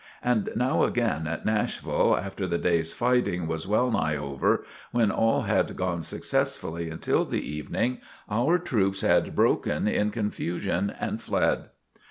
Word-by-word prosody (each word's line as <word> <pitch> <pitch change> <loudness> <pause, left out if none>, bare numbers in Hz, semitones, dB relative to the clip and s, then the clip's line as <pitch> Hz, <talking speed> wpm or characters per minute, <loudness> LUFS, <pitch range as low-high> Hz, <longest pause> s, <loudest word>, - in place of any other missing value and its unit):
And 120 -4 +1
now 125 +2 +2
again 115 -10 0
at 80 0 -4
Nashville, 110 -1 +1
after 95 0 -4
the 85 -1 0
day's 85 -2 +1
fighting 120 -8 +1
was 80 +2 -3
well 120 +5 +2
nigh 80 -8 +1
over, 70 -2 0 0.3
when 115 -3 +2
all 115 0 +2
had - - +1
gone 90 -2 -1
successfully 80 +1 -1
until 80 - 0
the - - -3
evening, 75 +11 -2 0.3
our 120 +11 +2
troops 100 - 0
had - - +2
broken - - +2
in 105 0 +1
confusion 100 -3 -2
and - - -3
fled. - - +1
95 Hz, 145 wpm, -27 LUFS, 85-115 Hz, 0.3 s, now